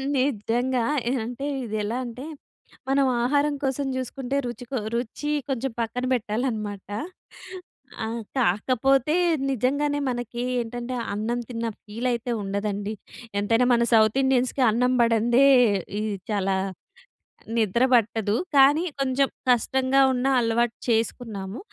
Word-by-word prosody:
నిజంగా 250 Hz, -1 st, 0 dB, 0.3 s
ఎ -, -, +1 dB
అంటే 245 Hz, +4 st, -5 dB, 0.2 s
ఇదెలా 215 Hz, +1 st, -2 dB
అంటే 245 Hz, +3 st, -7 dB, 0.6 s
మనం 275 Hz, 0 st, +3 dB, 0.2 s
ఆహారం 285 Hz, +3 st, +2 dB
కోసం 270 Hz, +1 st, -1 dB
జూసుకుంటే 260 Hz, +1 st, -3 dB
రుచి 245 Hz, 0 st, -6 dB
కొ 265 Hz, -, -1 dB, 0.2 s
రుచి 245 Hz, +5 st, -3 dB, 0.2 s
కొంచెం 265 Hz, 0 st, -1 dB
పక్కన 235 Hz, +2 st, -2 dB
బెట్టాలనమాట. 215 Hz, -3 st, -2 dB, 1.2 s
ఆహ్, 230 Hz, +1 st, -4 dB, 0.2 s
కాకపోతే 255 Hz, -, +2 dB, 0.3 s
నిజంగానే 285 Hz, +4 st, 0 dB
మనకి 240 Hz, -1 st, -4 dB, 0.2 s
ఏంటంటే 240 Hz, +2 st, -5 dB, 0.2 s
అన్నం 220 Hz, +4 st, -2 dB
తిన్న 230 Hz, -1 st, -3 dB, 0.2 s
ఫీలయితే 235 Hz, +2 st, -2 dB
ఉండదండి. 200 Hz, +1 st, -3 dB, 0.5 s
ఎంతైనా 225 Hz, +4 st, +2 dB
మన 235 Hz, 0 st, +3 dB
సౌత్ 220 Hz, +2 st, +5 dB
ఇండియన్స్‌కీ 260 Hz, 0 st, +1 dB
అన్నం 250 Hz, +3 st, +2 dB
బడందే 235 Hz, +3 st, +4 dB, 0.5 s
ఈ -, -, -1 dB, 0.3 s
చాలా 195 Hz, -2 st, +1 dB, 1.0 s
నిద్ర 225 Hz, +2 st, +2 dB
బట్టదు. 220 Hz, -2 st, +1 dB, 0.2 s
కానీ 285 Hz, +5 st, +6 dB, 0.2 s
కొంచెం 270 Hz, +1 st, +2 dB, 0.2 s
కష్టంగా 260 Hz, +2 st, +2 dB
ఉన్న 250 Hz, +1 st, 0 dB
అలవాటు 230 Hz, 0 st, +1 dB
చేసుకున్నాము. 225 Hz, -3 st, -2 dB
240 Hz, 110 wpm, -25 LUFS, 220-260 Hz, 1.2 s, కానీ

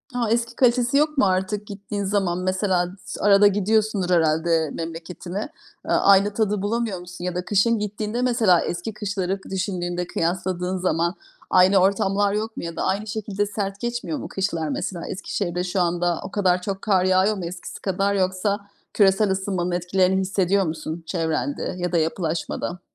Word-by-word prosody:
A, 235 Hz, -2 st, 0 dB
eski 235 Hz, 0 st, 0 dB
kalitesi 250 Hz, +1 st, +3 dB
yok 300 Hz, 0 st, +2 dB
mu 265 Hz, -, +5 dB
artık 190 Hz, +2 st, 0 dB
gittiğin 200 Hz, 0 st, -5 dB
zaman? 190 Hz, -3 st, 0 dB
Mesela 185 Hz, -1 st, +1 dB, 0.2 s
s -, -, -6 dB
arada 205 Hz, 0 st, +6 dB
gidiyorsundur 205 Hz, -1 st, +1 dB
herhâlde 160 Hz, -1 st, +2 dB
memleketine. 170 Hz, +3 st, -6 dB, 0.5 s
Eee, -, -, -3 dB
aynı 200 Hz, +1 st, +5 dB
tadı 210 Hz, -2 st, 0 dB
bulamıyor 215 Hz, -2 st, -1 dB
musun? 180 Hz, 0 st, -10 dB
Ya 180 Hz, -1 st, -2 dB
da 180 Hz, -, -3 dB
kışın 215 Hz, +2 st, +2 dB
gittiğinde 210 Hz, +3 st, -3 dB
mesela 230 Hz, -9 st, +4 dB
eski 175 Hz, +5 st, -4 dB
kışları 195 Hz, -2 st, -2 dB
k -, -, -13 dB
düşündüğünde, 180 Hz, -2 st, -2 dB
kıyasladığın 180 Hz, +2 st, -1 dB
zaman 170 Hz, 0 st, 0 dB, 0.3 s
aynı 185 Hz, +1 st, +5 dB
ortamlar 195 Hz, +1 st, +2 dB
yok 220 Hz, +1 st, -3 dB
mu -, -, -4 dB
ya 170 Hz, -1 st, -5 dB
da -, -, -2 dB
aynı 200 Hz, +3 st, -1 dB
şekilde 205 Hz, -1 st, -2 dB
sert 200 Hz, -1 st, -4 dB
geçmiyor 240 Hz, +6 st, -3 dB
mu -, -, -6 dB
kışlar, 170 Hz, -5 st, -2 dB
mesela? 170 Hz, +3 st, -4 dB
Eskişehir'de 180 Hz, -2 st, -3 dB
şu 180 Hz, +1 st, 0 dB
anda 175 Hz, 0 st, +1 dB
o -, -, -7 dB
kadar 185 Hz, -3 st, +2 dB
çok 195 Hz, 0 st, -4 dB
kar 190 Hz, -4 st, +2 dB
yağıyor 185 Hz, +3 st, +3 dB
mu 180 Hz, -, -4 dB
eskisi 175 Hz, +1 st, -7 dB
kadar? 195 Hz, +1 st, 0 dB
Yoksa 190 Hz, +2 st, 0 dB, 0.3 s
küresel 195 Hz, 0 st, +4 dB
ısınmanın 190 Hz, -2 st, -1 dB
etkilerini 185 Hz, +2 st, +2 dB
hissediyor 195 Hz, 0 st, +1 dB
musun 160 Hz, +1 st, -5 dB
çevrende 165 Hz, -, -2 dB
ya 180 Hz, 0 st, -2 dB
da 175 Hz, -, +2 dB
yapılaşmada? 165 Hz, +2 st, -2 dB
190 Hz, 165 wpm, -23 LUFS, 180-205 Hz, 0.5 s, arada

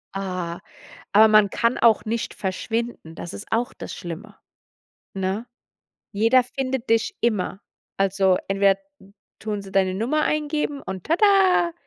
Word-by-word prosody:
Ah, 180 Hz, -3 st, -4 dB, 0.5 s
aber 215 Hz, +2 st, +7 dB
man 215 Hz, -2 st, +5 dB
kann 235 Hz, +1 st, +1 dB
auch 230 Hz, -3 st, +4 dB
nicht 225 Hz, +1 st, -3 dB
verschwinden, 220 Hz, -1 st, -4 dB
das 170 Hz, +1 st, -7 dB
ist 205 Hz, -, -8 dB
auch 240 Hz, +3 st, 0 dB
das -, -, -8 dB
Schlimme, 175 Hz, -1 st, -8 dB, 0.8 s
ne? 195 Hz, +5 st, -2 dB, 0.7 s
Jeder 230 Hz, +5 st, +4 dB
findet 260 Hz, 0 st, -4 dB
dich 225 Hz, +1 st, +1 dB
immer. 205 Hz, -4 st, -1 dB, 0.4 s
Also, 195 Hz, -1 st, +2 dB
entweder 195 Hz, 0 st, +3 dB, 0.6 s
tun 210 Hz, -2 st, -3 dB
sie 195 Hz, -, -12 dB
deine 190 Hz, -1 st, +2 dB
Nummer 250 Hz, +10 st, 0 dB
eingeben 300 Hz, -2 st, -1 dB
und 190 Hz, -6 st, -7 dB
tada 370 Hz, -1 st, +4 dB
215 Hz, 130 wpm, -23 LUFS, 195-250 Hz, 0.8 s, aber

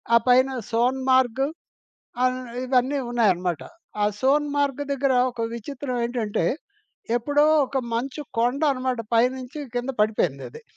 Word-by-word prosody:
ఆ -, -, +9 dB
పైన 255 Hz, +2 st, +5 dB, 0.2 s
సోన్ 245 Hz, +3 st, +1 dB
మార్గ్, 260 Hz, 0 st, +3 dB, 0.8 s
ఆహ్ 255 Hz, 0 st, +2 dB, 0.3 s
ఇవన్నీ 255 Hz, +2 st, +1 dB
ఉన్నాయన్నమాట. 185 Hz, -8 st, +1 dB, 0.4 s
ఆ -, -, +4 dB, 0.2 s
సోన్ 290 Hz, +3 st, +3 dB
మార్గ్ 285 Hz, -1 st, 0 dB
దగ్గర 275 Hz, 0 st, +1 dB, 0.2 s
ఒక 235 Hz, -1 st, -5 dB
విచిత్రమేంటంటే, 240 Hz, -, -3 dB, 0.7 s
ఎప్పుడో 290 Hz, +5 st, +2 dB, 0.2 s
ఒక 265 Hz, -, -2 dB, 0.2 s
మంచు 265 Hz, +5 st, -3 dB, 0.2 s
కొండనమాట. 255 Hz, 0 st, +1 dB, 0.2 s
పైనుంచి 255 Hz, +4 st, 0 dB, 0.2 s
కింద 245 Hz, +2 st, -1 dB
పడిపోయిందది. 210 Hz, -, -1 dB
255 Hz, 110 wpm, -24 LUFS, 235-270 Hz, 0.8 s, ఆ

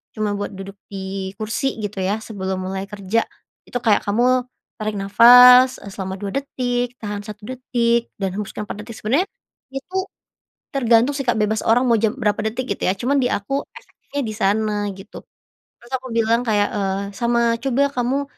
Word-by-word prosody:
cuma 215 Hz, -2 st, -1 dB
buat 205 Hz, -, -4 dB
duduk 195 Hz, +1 st, -9 dB
di 190 Hz, -1 st, -5 dB
kursi 225 Hz, +5 st, -2 dB
gitu, 205 Hz, -1 st, -4 dB
ya, 200 Hz, +4 st, -1 dB
sebelum 190 Hz, -3 st, -4 dB
mulai 190 Hz, +1 st, -4 dB
kerja. 205 Hz, +2 st, -1 dB, 0.4 s
Itu 245 Hz, -, -3 dB
kayak 215 Hz, -3 st, +3 dB
kamu 250 Hz, +5 st, +3 dB, 0.4 s
tarik 215 Hz, 0 st, -2 dB
nafas, 250 Hz, +5 st, +8 dB
eee, 200 Hz, -, -8 dB
selama 190 Hz, -1 st, -5 dB
2 200 Hz, 0 st, -4 dB
detik, 245 Hz, -3 st, -2 dB
tahan 205 Hz, -1 st, -5 dB
1 210 Hz, 0 st, -9 dB
detik 235 Hz, -2 st, +1 dB
dan 195 Hz, -1 st, 0 dB
hembuskan 210 Hz, 0 st, -4 dB
4 210 Hz, +1 st, -6 dB
detik." 230 Hz, -, -8 dB
Sebenernya 275 Hz, -, +2 dB, 0.5 s
itu 320 Hz, +8 st, -5 dB, 0.8 s
tergantung, 240 Hz, -1 st, +3 dB
sih, 275 Hz, -2 st, -4 dB
Kak, 240 Hz, -, +3 dB
bebas 215 Hz, 0 st, +1 dB
orang 235 Hz, +3 st, +4 dB
mau 230 Hz, -, +4 dB
jam 220 Hz, 0 st, +1 dB
berapa 210 Hz, -5 st, 0 dB
detik 245 Hz, +2 st, -5 dB
gitu, -, -, -11 dB
ya, 185 Hz, -, +2 dB
cuman 265 Hz, +7 st, +1 dB
di 250 Hz, -, +1 dB
aku 250 Hz, +5 st, -1 dB, 0.2 s
efektifnya 475 Hz, -11 st, -8 dB
di 220 Hz, -, -3 dB
sana 210 Hz, +1 st, +1 dB, 0.2 s
gitu. 195 Hz, +2 st, -11 dB, 0.6 s
Terus 240 Hz, -, -18 dB
aku 260 Hz, 0 st, -3 dB
bilang 230 Hz, 0 st, +2 dB
kayak, 210 Hz, -4 st, +1 dB
eee, 195 Hz, -1 st, -1 dB
"Sama 235 Hz, 0 st, +2 dB
coba 275 Hz, +1 st, +2 dB
kamu 255 Hz, +3 st, 0 dB
225 Hz, 175 wpm, -21 LUFS, 205-245 Hz, 0.8 s, nafas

